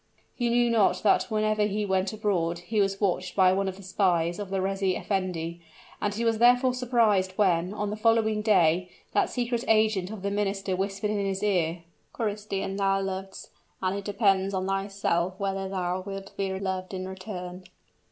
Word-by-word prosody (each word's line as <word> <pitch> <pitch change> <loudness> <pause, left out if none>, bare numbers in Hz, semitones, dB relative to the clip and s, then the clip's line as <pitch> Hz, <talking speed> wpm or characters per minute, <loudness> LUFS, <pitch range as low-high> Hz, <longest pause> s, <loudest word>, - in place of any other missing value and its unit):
He 240 -2 0
knew 240 0 +3
not 200 -5 +3
that 210 - +4
whenever 215 -1 +1
he 210 +1 -1
went 190 -1 0
abroad, 185 -6 0
he 205 +5 -1
was 195 0 0
watched 185 -2 -1
by 185 -2 +5
one 195 +1 0
of 190 0 -4
the 195 - -12
spies 175 -2 +1
of 205 -2 -5
the 195 0 -1
reis 195 +1 -2
effendi; 180 -3 -1 0.4
and 205 - 0
he 225 +3 -2
was 225 -1 +1
therefore 245 +2 +5
surprised 230 -7 +2
when, 180 -3 +2
on 210 0 -3
the - - -2
following 220 -1 +2
day, 180 -4 +3 0.2
that - - +2
secret 240 -1 -1
agent 215 -4 +3
of 210 -3 -8
the 200 - -1
minister 195 -2 -1
whispered 195 +2 -2
in 205 -1 -1
his 195 0 -2
ear, 175 -4 0 0.3
"Christian, 205 -3 -3
thou 195 -1 +2
lovest 195 0 -5 0.3
and 185 0 -1
it 200 - -4
depends 195 -2 +2
on 185 0 -1
thyself 195 -2 -1
whether 195 -1 -2
thou 185 -1 -2
wilt 195 0 -8
be 190 -1 -2
loved 190 -1 -3
in 185 0 -4
return!" 185 -1 -7
195 Hz, 180 wpm, -27 LUFS, 185-210 Hz, 0.4 s, by